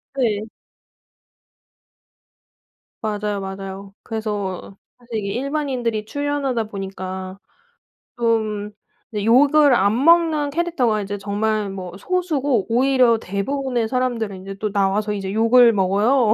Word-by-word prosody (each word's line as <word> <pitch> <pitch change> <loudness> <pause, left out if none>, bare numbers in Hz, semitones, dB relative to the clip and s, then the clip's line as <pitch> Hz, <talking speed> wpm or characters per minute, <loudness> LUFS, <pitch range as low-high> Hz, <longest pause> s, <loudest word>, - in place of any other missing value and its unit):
네. 220 -5 0 2.5
맞아요 210 -1 -2
맞아요. 195 0 -7
그래서 205 -4 -4 0.2
사실 240 -2 -6
이게 200 -1 -3
일반인들이 255 -5 -2
출연하다 280 -2 -1
보니까 190 -2 -6 0.8
좀 215 -3 0 0.4
이제 210 -2 -3
욕을 285 +4 +5
안 210 +5 +2
먹는 325 -3 +4
캐릭터가 285 -9 0
이제 205 0 -4
정말 210 +1 -1
뭐 185 -2 -7
소수고 290 - 0
오히려 250 -1 +3
대부분의 240 +5 -2
사람들은 230 -6 -2
이제 195 +1 -7
또 210 +1 -3
나와서 205 +1 +1
이제 195 -2 -4
욕을 230 +2 +6
먹어요. 210 +4 +3
220 Hz, 255 characters per minute, -21 LUFS, 200-260 Hz, 2.5 s, 욕을